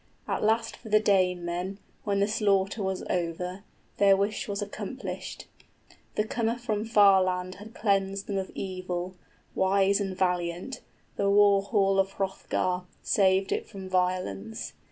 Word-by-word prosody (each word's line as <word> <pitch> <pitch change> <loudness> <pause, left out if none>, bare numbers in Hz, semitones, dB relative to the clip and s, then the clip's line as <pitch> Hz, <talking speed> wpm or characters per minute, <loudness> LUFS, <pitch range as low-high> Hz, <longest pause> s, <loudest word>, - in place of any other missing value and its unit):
At - - -1
last 225 +1 +1
for 220 - -11
the 215 0 +5
Danemen, 180 -2 +1 0.3
When 200 -1 +1
the 200 - +3
slaughter 205 -1 +1
was 190 -1 -2
over, 180 +2 -2 0.3
their 195 -1 +6
wish 200 +2 -1
was 200 -1 -3
accomplished. 205 -1 -6 0.7
The 210 - +2
comer 230 +1 -1
from 220 -3 -2
far 205 -4 +6
land 185 0 -1
had 220 +2 -11
cleansed 195 -1 0
then 200 -1 -1
of 190 - -4
evil, 185 -2 -3
35 185 - -22 0.4
Wise 195 +1 +3
and 190 -2 -3
valiant, 180 +6 -1 0.4
the 200 - +2
war 200 0 +5
hall 195 -1 +2
of 195 0 +1
Hrothgar, 185 -1 -1 0.2
Saved 190 -1 +3
it - - -2
from 190 -1 -8
violence. 180 - -1
195 Hz, 150 wpm, -28 LUFS, 185-205 Hz, 0.7 s, their